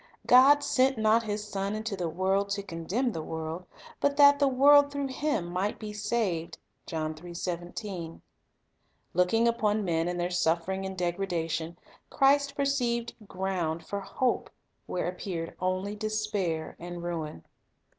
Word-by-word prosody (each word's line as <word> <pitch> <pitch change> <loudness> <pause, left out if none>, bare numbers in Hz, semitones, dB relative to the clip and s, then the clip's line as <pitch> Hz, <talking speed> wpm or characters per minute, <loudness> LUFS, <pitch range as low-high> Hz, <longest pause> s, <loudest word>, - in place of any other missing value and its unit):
"God 275 +4 +7
sent 265 -2 +2
not 220 +1 +4
His 210 -1 -4
Son 200 0 -2
into 215 -1 -3
the 175 -3 -2
world 190 +4 0
to 200 0 -2
condemn 195 +8 -2
the 165 - -4
world; 160 +3 -5 0.3
but 285 0 +1
that 285 0 +7
the 285 - +4
world 285 +2 +6
through 280 -1 -2
Him 285 - -1
might 180 +4 -2
be 215 -1 -7
saved." 210 -6 -1 0.3
1 155 -1 -2 2.0
Looking 180 +7 +3
upon 215 -3 +1
men 165 -1 0
in 175 0 -2
their 175 +1 -1
suffering 175 +2 0
and 190 0 -7
degradation, 170 -2 -2 0.3
Christ 280 0 +3
perceived 245 -4 0
ground 175 -4 -2
for 200 - -3
hope 245 +5 -1 0.4
where 180 - -2
appeared 175 -2 -4
only 185 +3 -1
despair 210 -7 -2
and 175 0 -7
ruin. 160 - -5
195 Hz, 135 wpm, -29 LUFS, 175-235 Hz, 2.0 s, God